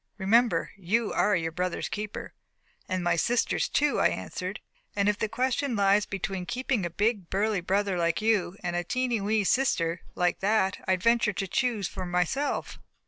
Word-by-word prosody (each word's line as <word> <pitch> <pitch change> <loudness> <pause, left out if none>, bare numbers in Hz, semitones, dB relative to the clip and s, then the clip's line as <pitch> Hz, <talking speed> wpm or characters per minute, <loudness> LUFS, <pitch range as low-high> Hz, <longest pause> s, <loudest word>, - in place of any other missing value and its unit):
Remember, 210 -2 +2
you 210 +4 0
are 210 - +3
your 165 -1 -1
brother's 180 +2 -2
keeper." 210 0 -5 0.6
"And 185 -1 -1
my 175 -1 +2
sister's 240 +8 +1
too," 295 0 +2
I - - +5
answered. - - -4 0.4
"And 200 0 +1
if 210 0 +1
the 220 - -1
question 255 +3 0
lies 200 0 +3
between 190 -1 -4
keeping 245 -6 -1
a - - -7
big, 205 +1 0
burly 205 0 0
brother 195 +1 0
like 170 -1 +1
you, 210 -4 +1
and 175 0 -2
a 175 - 0
tiny, 245 +2 -1
wee 210 +1 +1
sister 175 -8 +1
like 180 -1 +1
that, 200 -1 +1
I 190 - +4
venture 225 +3 +2
to 195 +1 -3
choose 225 -2 0
for 185 -2 -6
myself." 180 - -1
200 Hz, 175 wpm, -27 LUFS, 180-225 Hz, 0.6 s, I